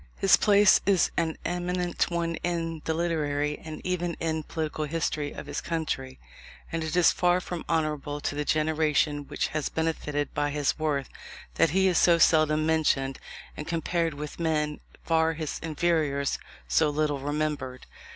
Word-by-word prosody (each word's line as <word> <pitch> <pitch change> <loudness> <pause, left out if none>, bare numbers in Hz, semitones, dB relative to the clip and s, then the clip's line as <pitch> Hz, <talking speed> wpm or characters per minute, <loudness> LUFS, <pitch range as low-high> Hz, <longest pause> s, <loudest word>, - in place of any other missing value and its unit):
His 195 - +6
place 205 -1 +5
is 195 -4 +3
an 165 -2 -1
eminent 180 0 -1
one 170 -1 -1
in 165 -2 -3
the 160 - 0
literary, 150 -3 -1
and 155 -1 -7
even 175 -2 -1
in 160 -1 -1
the 155 - -4
political 155 -1 -3
history 150 -1 -2
of - - -8
his 145 0 -4
country; 155 -6 -3 0.5
and 165 0 -2
it 160 +1 -3
is 180 -1 +6
far 180 0 +2
from 175 -2 -5
honourable 150 -3 -1
to - - -2
the 150 +1 -2
generation 150 -1 +1
which - - -2
has 155 -1 -2
benefited 150 -3 -2
by 145 0 0
his 145 +1 -1
worth, 145 -4 0 0.5
that 160 - +3
he 190 +5 +3
is 180 -3 +3
so 170 -1 +5
seldom 155 -2 +4
mentioned, 145 -4 +1 0.4
and, 150 - -7
compared 165 -1 -1
with 150 +2 -7
men 150 -2 0 0.2
far 160 0 +2
his 155 -2 -4
inferiors, 155 -3 0 0.3
so 155 -2 +3
little 150 -1 0
remembered. 145 -3 -3
155 Hz, 160 wpm, -27 LUFS, 150-165 Hz, 0.5 s, His